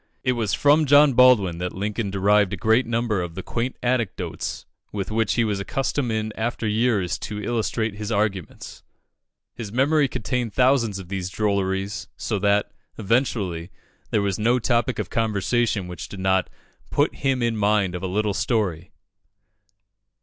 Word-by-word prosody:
It 125 - +2
was 110 -5 0
from 150 +1 +4
John 145 0 +6
Baldwin 115 -9 +5
that 90 0 -3
Lincoln 105 +2 -2
derived 100 +1 +3
a - - -3
great 110 +3 +2
number 115 -4 0
of 85 -1 -6
the 95 - -5
quaint 120 +2 -3
anecdotes 120 -5 -2 0.3
with 100 0 -4
which 110 +1 +1
he 120 - +3
was 105 -3 -1
accustomed 130 +4 -1
in 110 -1 -2
after 115 0 -2
years 105 -4 +1
to 105 -1 -5
illustrate 110 0 -1
his 105 +2 -5
arguments. 100 -4 -3 0.7
His 110 -4 -7
memory 140 +4 +3
contained 120 -2 -3
thousands 125 -5 +2
of 95 -3 -9
these 95 -2 -3
drolleries; 100 -1 -1
so 105 -4 -2
that, 100 +1 +1 0.3
eventually, 100 -6 -1 0.4
there 105 - +1
was 100 -1 -1
no 120 +4 +3
topic 120 0 0
of - - -4
conversation 110 -1 0
which 90 -1 -7
did 100 - -8
not 95 0 +1 0.4
"put - - +1
him 135 -3 0
in 115 -1 +1
mind 105 -3 +1
of 90 - -5
a 95 - -2
little 105 +2 0
story." 95 - -1
105 Hz, 160 wpm, -23 LUFS, 95-120 Hz, 0.7 s, John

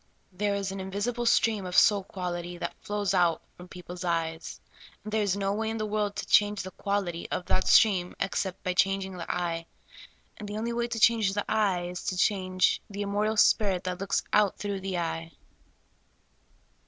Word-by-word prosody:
There 200 +2 -1
is 195 -1 -2
an 195 - -5
invivsible 205 +6 -2
stream 220 -3 +3
of 180 0 -2
soul 205 -2 +5
quality 175 -2 -5
that - - -4
flows 205 -2 -1
out 170 -2 +2
from 180 - -12
people's 180 0 -9
eyes, 165 -2 -2 0.4
and 215 - -7
there 220 - +2
is 200 -1 0
no 195 0 0
way 220 +1 -1
in 225 - -3
the 215 - -2
world 210 -1 -1
to - - -4
change 205 0 +3
the 185 - -7
quality 195 -5 -3
of 180 - -3
that 185 - 0
stream 190 -5 +4
except 195 -1 -2
by 185 - 0
changing 190 +1 +1
the 170 - -4
eye, 165 -1 -2 0.7
and 210 -1 -7
the 205 - -4
only 230 +2 -2
way 235 0 -1
to 230 -1 -4
change 220 -3 +4
the 205 - -1
eye 200 -5 +1
is 180 +1 -5
to 185 - -2
change 185 -2 +2
the 205 0 -4
immortal 210 +2 0
spirit 200 -4 +3
that 180 0 -3
looks 195 +1 0
out 210 -2 +3
through 200 -1 -3
the 190 -1 -3
eye. 165 -1 -3
195 Hz, 190 wpm, -28 LUFS, 180-210 Hz, 0.7 s, soul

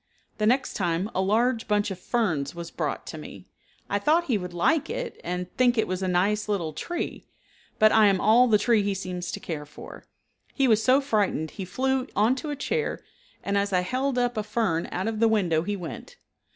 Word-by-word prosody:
The 215 - +2
next 255 +3 +2
time 180 +2 -1
a 190 - 0
large 225 +4 +1
bunch 205 -1 +1
of 185 - -6
ferns 175 - -1
was 170 -1 -7
brought - - -3
to - - -7
me. - - -10 0.4
I 200 - 0
thought 315 +10 +3
he 265 -9 0
would 180 -1 -6
like 275 - +1
it 485 0 -5
and 180 +1 -4
think 245 -1 +3
it 220 - +2
was 185 +1 -3
a 190 - -1
nice 205 +4 +1
little 170 -7 -1
tree, 345 - -5 0.5
but 215 0 +5
I 220 -1 +6
am 195 -2 +3
all 230 +6 +5
the 215 -3 +5
tree 220 +1 +3
he 200 -1 -1
seems 180 -2 -4
to - - -5
care 155 -3 -5
for. 150 - -12 0.5
He 270 -2 +3
was 220 -2 +4
so 260 +4 +4
frightened 205 - 0
he 195 - -6
flew 265 +7 -1
onto 250 +8 +1
a 290 - -2
chair, 455 - -2 0.4
and 200 - -1
as 200 0 -1
I 180 -1 +2
held 255 +7 -1
up 245 -1 0
a 215 - 0
fern 210 -6 -1
out 185 +4 -2
of 220 -1 -2
the 230 - +5
window 180 -8 +2
he 205 +4 -2
went. 200 - -8
210 Hz, 215 wpm, -26 LUFS, 180-250 Hz, 0.5 s, I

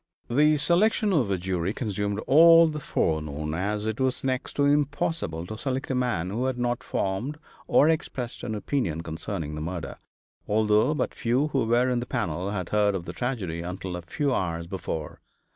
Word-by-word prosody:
The 150 +4 +4
selection 205 +7 +3
of 130 - +2
a 95 - +1
jury 90 +1 -2
consumed 105 -4 -2
all 165 +3 +8
the 150 -1 -3
forenoon, 75 - -1
as 105 +5 -2
it 110 +2 -2
was 130 -1 0
next 130 0 -2
to 145 - +2
impossible 145 - 0
to 110 +4 -7
select 135 -1 -2
a - - +1
man 120 -9 0
who 120 +5 -1
had 130 -1 -1
not 120 0 -1
formed 110 +10 -2 0.3
or 145 - +5
expressed 135 -6 -2
an 110 - -3
opinion 105 - -1
concerning 80 -1 -5
the 75 - -5
murder, 85 +1 -5 0.5
although 110 +6 +3
but - - -1
few 125 +6 +1
who 135 -5 +1
were 120 +2 +3
in 125 -1 +1
the 120 - -5
panel 85 +4 -2
had 95 -4 -3
heard 105 -1 +2
of 85 -3 -4
the - - -6
tragedy 105 -10 -3
until 90 +1 -5
a 90 - -5
few 135 - -1
hours 85 -5 -1
before. 85 -3 -5
110 Hz, 185 wpm, -26 LUFS, 90-135 Hz, 0.5 s, all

